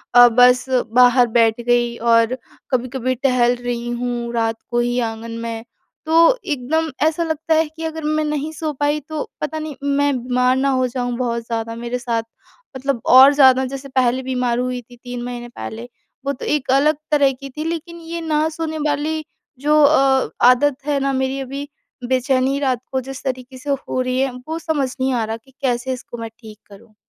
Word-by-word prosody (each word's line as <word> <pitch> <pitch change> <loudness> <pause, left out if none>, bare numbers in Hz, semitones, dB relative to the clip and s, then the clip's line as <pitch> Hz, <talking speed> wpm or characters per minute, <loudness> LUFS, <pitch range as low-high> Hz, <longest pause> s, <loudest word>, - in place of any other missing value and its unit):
अ, 245 0 +10
बस 250 +1 +5 0.3
बाहर 245 0 +6
बैठ 225 0 +3
गई 240 0 +1
और 230 +2 +3 0.3
कभी-कभी 255 0 -1
टहल 245 -1 +2
रही 240 0 -4
हूँ, 240 -1 -3
रात 225 -1 -1
को 240 - +1
ही 245 +1 0
आँगन 225 +1 -8
में। 230 -1 -5 0.4
तो 330 +9 +5
एकदम 310 +2 -1
ऐसा 320 +2 +1
लगता 320 0 -1
है 320 0 +2
कि 325 - -7
अगर 320 -1 -5
मैं 310 0 0
नहीं 300 +1 -2
सो 310 -1 -3
पाई, 290 +2 0
तो 305 +1 -6
पता 310 +1 -3
नहीं, 310 -2 -6
मैं 285 -1 +1
बीमार 250 0 +2
ना 275 +1 +1
हो 255 -1 +1
जाऊँ 245 -1 -3
बहुत 235 -2 -2
ज़्यादा, 230 -1 -3
मेरे 240 +1 -4
साथ 230 -2 -1 0.5
मतलब 265 -3 -2
और 265 +3 +8
ज़्यादा, 265 -2 +6
जैसे 275 +1 -7
पहले 260 0 +1
बीमार 250 -2 -1
हुई 250 0 -2
थी, 245 +1 -17
3 245 -1 -6
महीने 245 -1 -6
पहले, 235 0 -7 0.4
वो 280 - 0
तो - - -8
एक 280 -3 0
अलग 285 +3 +4 0.2
तरह 285 -2 +4
की 275 +2 -10
थी, 300 +4 -6
लेकिन 335 +1 -4
ये 335 +1 -6
ना 310 -1 +1
सोने 315 0 -4
वाली 305 +2 -1 0.4
जो 300 +2 +3
अ, 270 -2 +4 0.2
आदत 260 +2 +4
है 290 -2 +1
ना 275 0 0
मेरी 265 +1 -1
अभी, 275 +2 -5 0.4
बेचैनी 260 +1 +1
रात 260 -4 0
को 260 0 0
जिस 270 0 -8
तरीके 255 0 -5
से 270 +3 -8
हो 275 -2 -1
रही 255 0 -1
है, 270 0 +1 0.2
वो 320 +1 -3
समझ 295 -5 -1
नहीं 260 0 +1
आ 235 -2 0
रहा 225 +1 -4
कि 265 +4 -24
कैसे 255 0 0
इसको 240 -1 -8
मैं 230 -1 -6
ठीक 215 -2 -12
करूँ। 205 +2 -16
260 Hz, 195 wpm, -20 LUFS, 245-290 Hz, 0.5 s, अ